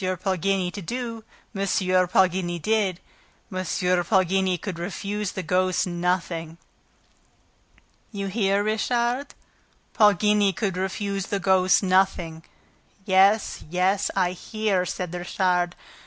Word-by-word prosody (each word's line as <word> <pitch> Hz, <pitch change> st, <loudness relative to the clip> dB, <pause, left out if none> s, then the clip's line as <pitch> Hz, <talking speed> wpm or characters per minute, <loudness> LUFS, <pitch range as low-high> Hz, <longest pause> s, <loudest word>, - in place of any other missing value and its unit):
Poligny 190 Hz, 0 st, 0 dB
to 200 Hz, -, -7 dB
do 230 Hz, +3 st, -5 dB, 0.3 s
M. 195 Hz, 0 st, -1 dB, 0.4 s
Poligny 180 Hz, -1 st, +1 dB
did. 205 Hz, -2 st, 0 dB, 0.5 s
M. 185 Hz, -, -5 dB, 0.5 s
Poligny 190 Hz, 0 st, +2 dB
could 180 Hz, -1 st, -6 dB
refuse 200 Hz, +3 st, -4 dB
the 190 Hz, -, -4 dB
ghost 185 Hz, +2 st, +1 dB
nothing." 175 Hz, -2 st, -2 dB, 1.5 s
"You 200 Hz, -2 st, -4 dB
hear, 200 Hz, 0 st, +1 dB
Richard: 240 Hz, +5 st, -1 dB, 0.6 s
Poligny 210 Hz, -1 st, +4 dB
could 195 Hz, -3 st, -2 dB
refuse 195 Hz, +1 st, -3 dB
the 200 Hz, -, -1 dB
ghost 190 Hz, +1 st, +3 dB
nothing." 185 Hz, -3 st, +1 dB, 0.6 s
"Yes, 195 Hz, +3 st, +3 dB
yes, 185 Hz, +3 st, +1 dB
I 180 Hz, -2 st, +2 dB
hear!" 195 Hz, -1 st, -1 dB
said 180 Hz, -2 st, -4 dB
Richard. 180 Hz, 0 st, 0 dB
190 Hz, 105 wpm, -24 LUFS, 180-205 Hz, 1.5 s, Poligny